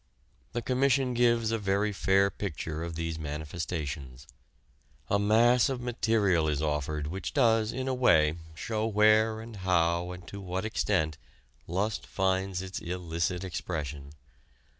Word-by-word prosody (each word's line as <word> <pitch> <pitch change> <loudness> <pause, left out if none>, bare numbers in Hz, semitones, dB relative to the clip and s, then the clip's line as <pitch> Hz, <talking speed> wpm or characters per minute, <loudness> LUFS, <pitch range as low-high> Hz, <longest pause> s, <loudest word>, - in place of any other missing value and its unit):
The 120 0 -2
Commission 130 0 +2
gives 120 -2 +2
a 115 - 0
very 100 +1 0
fair 100 0 +3
picture 80 -4 -4
of 85 -1 -5
these 80 0 -3
manifestations. 75 -3 -5 0.9
A 100 - +3
mass 115 +5 +4
of 130 -2 -2
material 110 -8 +1
is 75 -2 0
offered 75 0 -1
which 90 +5 -5
does 115 -1 +3
in 130 +2 -4
a 130 - +1
way 80 -12 +4 0.2
show 110 +5 -2
where 110 +1 +4
and 115 -1 -9
how 85 -2 +1
and 90 0 -10
to 100 - -8
what 95 +2 -3
extent 85 -8 0 0.5
lust 100 +5 -2
finds 95 -1 0
its 95 0 -5
illicit 85 0 -2
expression. 75 -5 -5
95 Hz, 140 wpm, -29 LUFS, 80-110 Hz, 0.9 s, mass